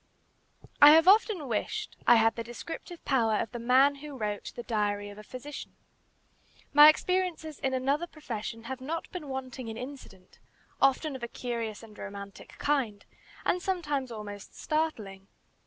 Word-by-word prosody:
I 290 +1 +11
have 325 +2 +6
often 400 - +4
wished 420 - -3
I 240 - +8
had 225 0 +4
the 230 - -4
descriptive 325 +8 -8
power 230 -6 +2
of 210 - -2
the 240 - -5
man 260 +4 +4
who 290 -1 -9
wrote 210 -3 -3
"The 240 - -6
Diary 205 -3 -1
of 205 - -12
a - - -10
Physician." 255 +6 -8 1.0
My 295 +1 +10
experiences 345 -2 0
in 265 -1 0
another 280 +6 0
profession 230 -8 -6
have 260 +2 -6
not 320 +5 -4
been 340 -6 -7
wanting 260 -2 -5
in 225 0 -6
incident, 250 -8 -10 0.4
often 275 +2 +3
of 260 - -7
a 235 - -3
curious 230 -3 -4
and 215 -2 -13
romantic 200 0 -9
kind, 250 -9 -1 0.4
and 360 - +1
sometimes 295 -9 -2
almost 205 -2 -8
startling. 215 -12 -2
255 Hz, 155 wpm, -29 LUFS, 220-300 Hz, 1.0 s, I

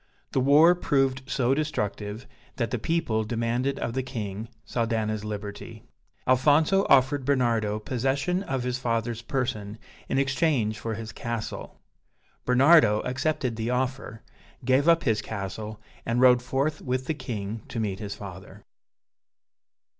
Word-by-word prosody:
The - - +1
war 145 +6 +6
proved 135 -6 +1
so 130 -1 +2
destructive 110 -6 -3 0.3
that 115 -3 -2
the 125 - -1
people 120 -6 0
demanded 120 +4 -1
of 115 - -3
the 130 - 0
King, 110 -4 -5 0.2
Saldana's 110 -3 -1
liberty. 105 +1 -7 0.4
Alfonso 150 +9 +4
offered 135 +1 +4
Bernardo 120 -6 +1
possession 135 - -1
of 135 -9 -2
his 125 0 -2
father's 115 -2 -1
person 115 -4 -3 0.3
in - - 0
exchange 135 -5 +1
for 115 -1 -3
his 110 0 -6
castle. 115 -1 -5 0.7
Bernardo 125 -4 +5
accepted 130 -3 -1
the 115 +1 -2
offer, 125 -3 -2 0.4
gave 130 +5 +4
up 165 0 +4
his 110 -4 +1
castle, 105 +1 -6 0.2
and 115 +1 0
rode 125 -1 +6
forth 140 +4 -1
with 130 0 -2
the 160 - -1
king 110 -6 -5
to 115 - -5
meet 100 -3 -2
his 105 -2 -5
father.) 95 -2 -10
125 Hz, 135 wpm, -26 LUFS, 110-135 Hz, 0.7 s, war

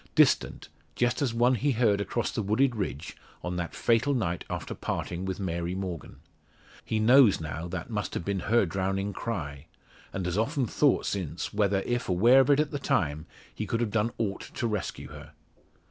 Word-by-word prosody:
Distant, - - +3 0.3
just 120 +2 +1
as 135 -4 +1
one 120 +2 +3
he 135 +3 +1
heard 110 -4 +2
across 115 +4 -2
the 115 - -2
wooded 115 +5 +2
ridge, 85 - -4 0.3
on 90 0 -3
that 85 -1 -4
fatal 120 +5 +2
night 90 -8 -1
after - - -4
parting 90 +2 -4
with 95 0 -3
Mary 85 -1 -2
Morgan. 95 -4 -5 0.7
He 110 - -2
knows 120 0 +6
now, 80 +2 -5
that 85 +5 -6
must 105 -2 -3
have - - -3
been 100 -1 -1
her 115 -2 +4
drowning 95 +3 -2
cry, 75 -12 -5 0.4
and 95 - -3
has 90 +3 0
often 135 +3 0
thought 140 +5 +2
since 90 -4 -3
whether, 100 -2 +2
if 120 -2 -2
aware 115 +9 +6
of 135 - +4
it 145 0 +5
at 150 -1 +1
the 145 - -3
time, 75 - 0 0.3
he - - -4
could 115 - -1
have 115 -3 -1
done 110 +1 +1
aught 100 -4 -2
to - - -2
rescue 105 -6 -3
her. - - -11
105 Hz, 190 wpm, -28 LUFS, 90-120 Hz, 0.7 s, knows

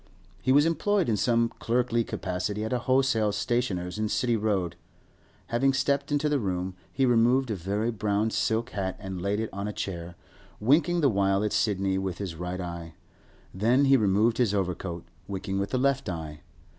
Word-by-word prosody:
He 130 - +1
was 145 +3 +6
employed 190 +3 +1
in 110 - +2
some 115 +1 +2
clerkly 120 0 +1
capacity 100 +2 -3
at 110 - -2
a 125 - +1
wholesale 130 -4 +2
stationer's 100 -4 -1
in 110 0 0
City 120 0 +1
Road. 100 -6 0 0.7
Having 135 +3 +2
stepped 140 +2 0
into 145 +1 +1
the 145 -1 +1
room, 95 -3 -2 0.2
he 135 - +1
removed 120 +1 +3
a - - 0
very 100 +6 -1
brown 105 0 0
silk 115 +3 0
hat 95 -2 -3
and 95 -2 -6
laid 100 +2 0
it 110 - -3
on 100 +1 -3
a - - -2
chair, 85 -3 -5 0.4
winking 155 +9 +3
the 145 - +5
while 100 -1 +2
at 105 - -1
Sidney 95 -3 +1
with 95 -2 -3
his 95 -4 -4
right 90 +2 -5
eye; 85 -2 -6 0.6
then 120 +8 +3
he 135 0 +6
removed 110 +1 +2
his 110 -5 +2
overcoat, 90 -2 -3 0.2
winking 95 0 -3
with 100 0 -1
the 130 - 0
left 135 -3 +1
eye. 80 -3 -6
105 Hz, 180 wpm, -27 LUFS, 95-125 Hz, 0.7 s, was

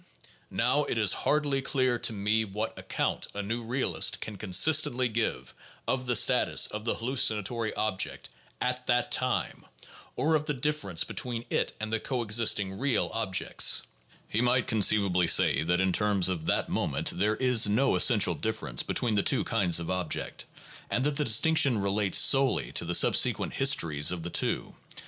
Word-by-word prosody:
Now, - - +1
it - - -3
is - - +3 0.2
hardly 145 -2 +1
clear 130 -3 0
to - - +1
me 105 +1 0
what 105 +2 -5
account - - -3
a 105 - -4
new 115 +4 -3
realist 120 +4 -1
can 110 - -7
consistently 125 - +3
give 115 0 -3 0.3
of 130 -1 -2
the 125 - +1
status - - +3
of 105 +1 -6
the 115 - -1
hallucinatory 115 -2 -1
object 105 -3 -3 0.3
at 125 0 -3
that 120 0 0
time, - - -1 0.5
or 160 +2 0
of 155 -1 0
the 150 - -1
difference 135 - -1
between 120 -2 -4
it - - -1
and 110 +1 -5
the 110 - +1
coexisting 105 -6 0
"real" 135 -2 0
ob 110 -5 -3
jects. - - +2 0.4
He 110 - -1
might 125 0 +2
conceivably 100 -4 +2
say - - +3
that 90 +3 0
in 95 -1 +1
terms 100 -3 +1
of 85 -3 -4
that - - 0
moment - - -2
there 105 +4 0
is 125 -3 +3
no 125 +7 +2
essential 110 -5 +3
difference 110 - -3
between 120 -3 -2
the 105 - +2
two 135 - +1
kinds 90 -7 +1
of 85 - -5
object, 90 -3 -3 0.4
that 125 - -1
the 150 - +1
distinction 140 +1 +3
relates 100 0 0
solely 135 -2 +3
to - - -1
the 85 +1 0
subsequent - - +2
histories 85 - +1
of 90 -2 -5
the 85 - -5
two. - - -1
110 Hz, 170 wpm, -28 LUFS, 100-125 Hz, 0.5 s, is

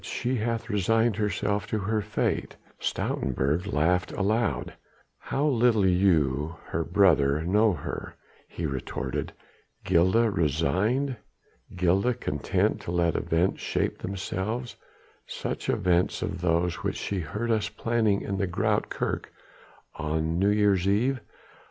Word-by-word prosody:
"She 125 +1 -2
hath 115 +1 -2
resigned 110 +1 +2
herself 105 -1 -1
to 110 - -1
her 105 +2 0
fate." 105 +1 -2 0.2
Stoutenburg 70 +8 -1
laughed 90 +4 +1
aloud. 105 - 0 0.5
"How 140 - -1
little 120 -7 +3
you 80 -5 +2
her 80 - -1
own 80 - -3
brother 80 -6 +4
know 105 +4 +3
her," 70 - -6 0.3
he 85 - -5
retorted. 70 -4 -3 0.5
"Gilda 95 +6 +3
resigned? 100 - +1 0.6
Gilda 95 +7 +2
content 75 - 0
to - - -5
let 85 -2 +2
events 85 +3 0
shape - - -1
themselves 100 +5 -3 0.5
such - - -4
events 90 +1 +1
as 95 -3 -4
those 85 0 +1
which - - -3
she 100 - -2
heard 105 +8 -3
us 110 -1 +1
planning 115 -4 +1
in 100 - -3
the 100 - +1
Groote 85 - 0
Kerk - - -3 0.6
on 80 +1 -1
New 100 +2 +3
Year's 100 -3 +3
Eve? 125 +7 +2
95 Hz, 125 wpm, -27 LUFS, 85-110 Hz, 0.6 s, brother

